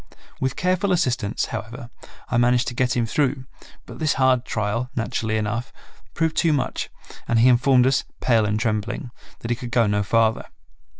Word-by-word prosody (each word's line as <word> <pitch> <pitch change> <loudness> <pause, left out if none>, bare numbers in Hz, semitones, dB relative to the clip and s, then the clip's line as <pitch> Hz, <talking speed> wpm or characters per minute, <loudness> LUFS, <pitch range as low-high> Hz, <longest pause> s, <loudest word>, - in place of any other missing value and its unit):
With 130 0 -1
careful 185 +2 0
assistance, 125 - 0
however, 120 +1 -6 0.4
I 120 - 0
managed 120 +1 +3
to - - -8
get 125 0 0
him 120 - +1
through, 130 +2 0 0.4
but - - -11
this 155 -3 +1
hard 130 -2 +2
trial, 110 +3 -2
naturally 110 -1 -1
enough, 110 +4 -3 0.4
proved 160 -1 0
too 165 -2 +3
much 140 - -2 0.4
and 115 - +2
he 115 +3 +5
informed 125 +1 +4
us, 130 0 +2 0.2
pale 115 -4 +2
and 105 +1 0
trembling, 110 +2 -2 0.3
that 115 - -4
he - - +2
could 125 0 -7
go 120 -1 +3
no 105 0 +1
farther. 110 +2 +1
120 Hz, 175 wpm, -23 LUFS, 110-130 Hz, 0.4 s, he